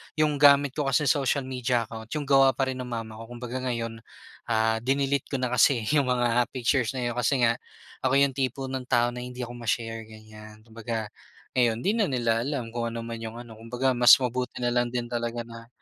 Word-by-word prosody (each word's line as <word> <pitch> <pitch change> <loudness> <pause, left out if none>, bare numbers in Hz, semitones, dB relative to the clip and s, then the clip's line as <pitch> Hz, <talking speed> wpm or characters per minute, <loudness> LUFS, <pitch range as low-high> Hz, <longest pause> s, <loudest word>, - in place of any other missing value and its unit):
yung 150 -2 +1
gamit 140 -1 +6
ko 145 -1 -2
kasi 135 +2 +2
social 140 0 +1
media 125 -2 -1
account 110 0 -9
yung 150 - -2
gawa 135 -2 +4
pa 135 - 0
rin 130 - -6
ng 125 - -5
mama 115 -2 -6
ko, 115 - -9
kumbaga 125 +1 -5
ngayon, 115 -2 -3 0.5
ah, 110 -1 +1
dinelete 135 +2 0
ko 135 - -4
na 125 -1 -1
kasi 125 -2 +4
yung 145 -4 +2
mga 120 -1 +2
pictures 125 0 +1
na 125 - -2
yun 120 - -1
kasi 125 +1 +1
nga 115 +1 +2 0.4
ako 130 +1 +1
yung 140 0 +4
tipo 130 0 -3
ng 130 -1 -4
tao 120 -1 +2
na 125 - -7
hindi 125 0 -6
ako 120 - -6
ma-share, 115 -1 -3
ganyan. 110 0 -14
Kumbaga, 110 -1 -5 0.4
ngayon 120 -2 +1
hindi 200 - +2
na 220 -4 +1
nila 120 -4 0
alam 125 -3 -3
kung 120 0 -2
ano 115 0 -5
man 115 0 -6
yung 115 0 -7
ano, 115 -2 -10
kumbaga 125 +3 -1
mas 120 -1 +8
mabuti 125 -1 -3
nalang 120 0 +1
din 120 0 -4
talaga 120 0 -2
na 115 0 -12
120 Hz, 215 wpm, -26 LUFS, 115-130 Hz, 0.5 s, mas